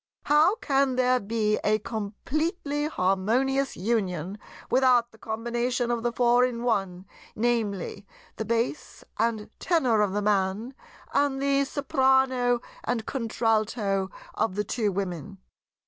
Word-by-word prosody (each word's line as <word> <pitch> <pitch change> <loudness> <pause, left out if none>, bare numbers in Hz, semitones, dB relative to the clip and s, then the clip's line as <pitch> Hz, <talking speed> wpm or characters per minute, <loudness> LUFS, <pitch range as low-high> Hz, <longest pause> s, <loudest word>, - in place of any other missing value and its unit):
"How 305 +7 +4
can 275 - +1
there 255 0 +3
be 215 0 0
a 215 +1 +3
completely 285 - -3
harmonious 250 +6 +1
union 190 -3 -1 0.3
without 250 -2 +4
the 220 - -20
combination 240 +2 -1
of 235 -1 -1
the 240 0 0
Four 245 +1 +3
in 240 -2 -1
One, 195 -6 -1 0.3
viz. 215 -5 -1 0.4
the 220 - -3
Bass 235 +6 -2 0.2
and 220 -2 0
Tenor 255 -11 +2
of 200 -2 +1
the 205 0 -1
Man 205 +4 0 0.4
and 280 -1 +2
the 275 0 +2
Soprano 265 -4 +2 0.2
and 235 -2 -2
Contralto 215 -5 0 0.2
of 190 - -1
the 210 - 0
two 210 0 -1
Women?" 195 0 -4
235 Hz, 125 wpm, -26 LUFS, 210-260 Hz, 0.4 s, How